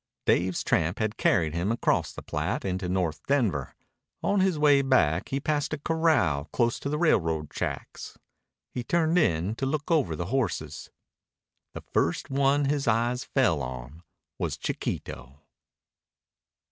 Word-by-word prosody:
Dave's 90 Hz, +1 st, +1 dB
tramp 80 Hz, +4 st, +1 dB
had 110 Hz, 0 st, -1 dB
carried 80 Hz, -10 st, +2 dB
him 85 Hz, +5 st, -1 dB
across 115 Hz, -, +1 dB
the -, -, -9 dB
Platte -, -, -2 dB
into 95 Hz, -1 st, -2 dB
North 90 Hz, -4 st, -1 dB
Denver. 110 Hz, -, 0 dB, 0.5 s
On 205 Hz, -, +2 dB
his 185 Hz, -3 st, +2 dB
way 145 Hz, -2 st, +5 dB
back 95 Hz, -, +2 dB
he 135 Hz, -, -1 dB
passed 150 Hz, 0 st, -1 dB
a -, -, -1 dB
corral 145 Hz, -, +1 dB
close 115 Hz, +9 st, 0 dB
to 140 Hz, -, -4 dB
the 150 Hz, -, -1 dB
railroad 80 Hz, -, +1 dB
tracks. -, -, -5 dB, 0.5 s
He 125 Hz, -, -4 dB
turned 170 Hz, +4 st, +2 dB
in 90 Hz, -, +1 dB
to 135 Hz, -, -1 dB
look 155 Hz, +4 st, -2 dB
over 140 Hz, -, +2 dB
the 85 Hz, -, -4 dB
horses. 130 Hz, -9 st, -2 dB, 0.9 s
The -, -, -7 dB
first 85 Hz, -, 0 dB
one 140 Hz, +1 st, +2 dB
his 140 Hz, -1 st, 0 dB
eyes 120 Hz, +3 st, +1 dB
fell 120 Hz, -, +2 dB
on 65 Hz, +4 st, -7 dB, 0.4 s
was -, -, -2 dB
Chiquito. 65 Hz, +3 st, -5 dB
115 Hz, 145 wpm, -27 LUFS, -, 0.9 s, way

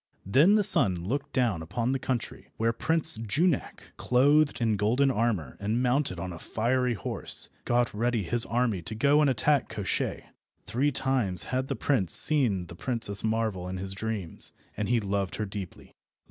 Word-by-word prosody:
Then 145 Hz, -, +4 dB
the 210 Hz, -, +3 dB
sun 105 Hz, -, +5 dB
looked 110 Hz, +12 st, -4 dB
down 115 Hz, -10 st, 0 dB
upon 115 Hz, +10 st, -3 dB
the 135 Hz, -, -1 dB
country 125 Hz, -2 st, -5 dB
where 115 Hz, +1 st, 0 dB
Prince 160 Hz, +3 st, 0 dB
Junak, 145 Hz, -, -2 dB
clothed 145 Hz, +4 st, +2 dB
in 115 Hz, -3 st, +1 dB
golden 120 Hz, +7 st, +1 dB
armour 105 Hz, -, -2 dB
and 110 Hz, +5 st, -1 dB
mounted 125 Hz, -, 0 dB
on 90 Hz, +1 st, -5 dB
a 85 Hz, -, -10 dB
fiery 125 Hz, +4 st, -1 dB
horse, -, -, -1 dB, 0.2 s
got 120 Hz, 0 st, 0 dB
ready 115 Hz, 0 st, -1 dB
his 115 Hz, +7 st, +2 dB
army 115 Hz, -6 st, -1 dB
to 110 Hz, +6 st, -5 dB
go 140 Hz, +6 st, +3 dB
and 145 Hz, -, +3 dB
attack 135 Hz, +3 st, +1 dB
Koshchei. 100 Hz, -2 st, -3 dB, 0.4 s
Three 140 Hz, +5 st, 0 dB
times 125 Hz, -8 st, -1 dB
had 130 Hz, +1 st, -1 dB
the -, -, -3 dB
prince 115 Hz, -, -1 dB
seen 120 Hz, -12 st, +6 dB
the 85 Hz, -, -12 dB
Princess 110 Hz, -2 st, 0 dB
Marvel 110 Hz, -5 st, -2 dB
in 95 Hz, -, -5 dB
his 95 Hz, +1 st, -5 dB
dreams, 100 Hz, -4 st, -6 dB, 0.2 s
and 105 Hz, 0 st, -3 dB
he 120 Hz, -1 st, +2 dB
loved 100 Hz, -2 st, -3 dB
her 110 Hz, -, -3 dB
deeply. 100 Hz, -3 st, -9 dB
115 Hz, 175 wpm, -27 LUFS, 100-130 Hz, 0.4 s, seen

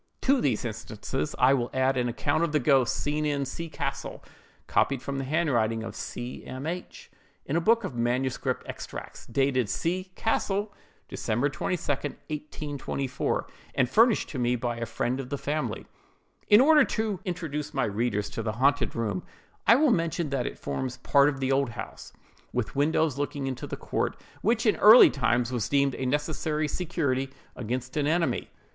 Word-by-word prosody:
To 270 Hz, 0 st, +3 dB
these 125 Hz, -4 st, 0 dB
instances 110 Hz, +5 st, -4 dB
I 130 Hz, +2 st, +5 dB
will 125 Hz, -3 st, 0 dB
add 130 Hz, +1 st, +2 dB
an 125 Hz, -1 st, 0 dB
account 145 Hz, +7 st, 0 dB
of 165 Hz, -2 st, -1 dB
the 150 Hz, -, +4 dB
ghost 135 Hz, -3 st, +3 dB
seen 150 Hz, +1 st, -1 dB
in 145 Hz, -2 st, 0 dB
C—— 165 Hz, +5 st, -5 dB
castle, -, -, -4 dB, 0.4 s
copied 135 Hz, -2 st, +2 dB
from 140 Hz, +2 st, -4 dB
the -, -, -2 dB
handwriting 120 Hz, -8 st, +1 dB
of -, -, -7 dB
C—— 120 Hz, +1 st, -6 dB
M—— 130 Hz, +2 st, -7 dB
H—— 175 Hz, +3 st, -6 dB, 0.3 s
in 140 Hz, -, -2 dB
a 170 Hz, -, +2 dB
book 230 Hz, +5 st, +3 dB
of 190 Hz, -, -4 dB
manuscript 125 Hz, +2 st, -1 dB
extracts, -, -, -8 dB
dated 130 Hz, -2 st, +1 dB
C—— 180 Hz, -, -1 dB
castle, 205 Hz, -2 st, 0 dB, 0.3 s
December 120 Hz, +6 st, -1 dB
22, 165 Hz, +5 st, -2 dB
1824, 145 Hz, -1 st, -3 dB, 0.3 s
and 130 Hz, -, +3 dB
furnished 225 Hz, -, +4 dB
to 135 Hz, -, -4 dB
me 120 Hz, 0 st, +2 dB
by 120 Hz, 0 st, -2 dB
a 115 Hz, 0 st, -3 dB
friend 120 Hz, +3 st, -1 dB
of 130 Hz, -2 st, -5 dB
the 140 Hz, -, -2 dB
family:— 145 Hz, +3 st, -3 dB, 0.6 s
"In 210 Hz, +2 st, +7 dB
order 300 Hz, +1 st, +7 dB
to 215 Hz, -6 st, -1 dB
introduce 165 Hz, -6 st, -4 dB
my 135 Hz, -, 0 dB
readers 105 Hz, -1 st, -1 dB
to 115 Hz, -, -4 dB
the 110 Hz, -1 st, -2 dB
haunted 140 Hz, +5 st, +2 dB
room, 105 Hz, -6 st, -1 dB, 0.5 s
I 230 Hz, -, +8 dB
will 290 Hz, +1 st, +4 dB
mention 165 Hz, -5 st, 0 dB
that 135 Hz, -3 st, 0 dB
it -, -, -6 dB
forms 130 Hz, -1 st, -4 dB
part 140 Hz, 0 st, +4 dB
of 135 Hz, -2 st, -4 dB
the 135 Hz, 0 st, 0 dB
old 135 Hz, -1 st, +2 dB
house, 115 Hz, -, -8 dB, 0.4 s
with 125 Hz, -1 st, -2 dB
windows 150 Hz, 0 st, +1 dB
looking 145 Hz, -1 st, -2 dB
into 130 Hz, -2 st, -4 dB
the -, -, -5 dB
court, -, -, -2 dB, 0.2 s
which 230 Hz, +2 st, +1 dB
in 215 Hz, -, +3 dB
early 220 Hz, +4 st, +9 dB
times 120 Hz, -2 st, +1 dB
was 120 Hz, -5 st, -1 dB
deemed 140 Hz, -1 st, +3 dB
a 130 Hz, -, -3 dB
necessary 150 Hz, +2 st, -1 dB
security 140 Hz, -6 st, -1 dB, 0.3 s
against 125 Hz, +3 st, -4 dB
an 145 Hz, -1 st, +1 dB
enemy. 165 Hz, +2 st, 0 dB
140 Hz, 175 wpm, -27 LUFS, 125-160 Hz, 0.6 s, early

